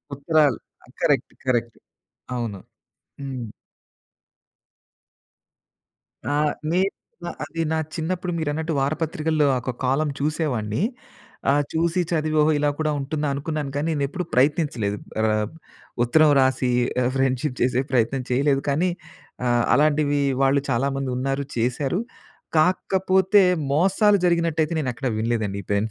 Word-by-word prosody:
ఉత్తరాలు 145 -3 +2 0.3
ఆ! - - -24
Correct. - - +1
Correct. 120 -3 0 0.6
అవును. 115 -5 -3 0.6
హ్మ్. 130 -4 -5 2.8
ఆ! - - 0 0.4
నేను 190 +3 +1 0.5
అది 165 +1 -4
నా - - +1 0.2
చిన్నప్పుడు 175 +2 -2
మీరున్నట్టు 160 +1 -2
వారపత్రికల్లో 155 0 0
ఒక 125 +1 -3
కాలమ్ 140 +3 +1
చూసేవాడిని. 140 - -1 0.7
ఆహ్, 145 +1 +3
చూసి 170 +2 +1
చదివి 155 -1 0
ఓహో! 155 +1 +4
ఇలా 145 0 +2
కూడా 155 -1 +1
ఉంటుందా 145 +2 -2
అనుకున్నాను 145 0 -3
కానీ 150 +3 -1
నేనేప్పుడు 145 +5 -2
ప్రయత్నించలేదు. 125 -7 +1 0.2
ఆహ్, 110 -1 +1 0.6
ఉత్తరం 150 +5 +5
రాసి 130 -1 +2 0.4
ఫ్రెండ్‌షిప్ 130 0 0
చేసే 125 +1 +2
ప్రయత్నం 125 +2 +1
చేయలేదు. 135 +2 +2
కానీ 170 +6 +2 0.6
ఆహ్, 120 -1 +3
అలాంటివి 145 0 +2 0.2
వాళ్ళు 135 +1 +3
చాలా 130 +3 +1
మందున్నారు 135 +1 -2
చేసారు. 130 - 0 0.6
కాకపోతే 190 +3 +3 0.3
మోసాలు 195 +6 +4
జరిగినట్టయితే 165 -2 +1
నేనెక్కడ 130 -1 -2
వినలేదండి. 110 -3 -1
ఈ - - -30
పెన్ 100 +2 +1
145 Hz, 110 wpm, -23 LUFS, 125-160 Hz, 2.8 s, ఉత్తరం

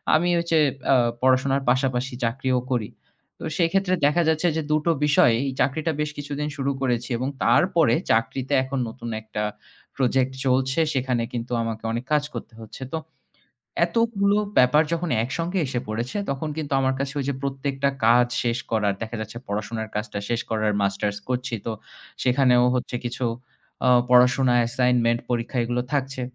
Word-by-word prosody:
আমি 175 +3 +2
ওই 170 - -3
যে 160 - +5 0.3
আ - - +6 0.3
পড়াশোনার 130 +1 +3
পাশাপাশি 130 0 0
চাকরিও 130 +2 0
করি। 115 -4 0 0.5
তো - - -9
সেই 170 -2 +3
ক্ষেত্রে 190 -1 +2
দেখা 150 +4 +3
যাচ্ছে 160 +2 +2
যে - - +1
২ 155 0 +3
টো 170 - +4
বিষয়ে 145 -5 +5
এই 135 - -1
চাকরিটা 155 +4 +1
বেশ 150 - -1
কিছুদিন 145 +1 -4
শুরু 140 0 0
করেছি 120 -1 0
এবং 130 +2 -2 0.2
তারপরে 170 -9 +4 0.2
চাকরিতে 125 +5 0
এখন 130 0 -3
নতুন 115 0 -8
একটা 110 -1 -4 0.5
project 130 0 +2
চলছে। 130 +3 +2
সেখানে 125 -3 0
কিন্তু 120 0 -4
আমাকে 110 -1 -4
অনেক 120 +2 -3
কাজ 150 -1 +3
করতে - - -7
হচ্ছে। 110 +4 -9
তো - - 0 0.9
এতগুলো 205 0 +1 0.2
ব্যাপার 125 +5 +6
যখন 170 0 -2
একসঙ্গে 170 +9 -2
এসে 125 -2 -2
পড়েছে 115 - -3
তখন 140 +3 -2
কিন্তু 145 -3 -3
আমার 130 0 +2
কাছে 140 0 -2
ওই 135 - -2
যে 140 - 0
প্রত্যেকটা 140 0 -1 0.2
কাজ 120 +1 +5 0.2
শেষ 120 0 0
করার, 105 -3 +1
দেখা 115 +1 -4
যাচ্ছে 110 +2 -7
পড়াশোনার 110 +2 -3
কাজটা 105 -1 -3
শেষ 120 -1 0
করার, 110 -1 +1
Masters 100 +1 -1
করছি 125 -1 -1
তো 115 - -1 0.5
সেখানেও 125 -1 +4
হচ্ছে 125 0 -3
কিছু 120 +1 -2 0.6
অ - - +6 0.2
পড়াশোনা, 125 +1 +5
assignment, 120 -1 +2
পরীক্ষা 120 +1 -2
এগুলো 120 +1 -1
থাকছে। 135 -2 -1
130 Hz, 165 wpm, -24 LUFS, 120-140 Hz, 0.9 s, আ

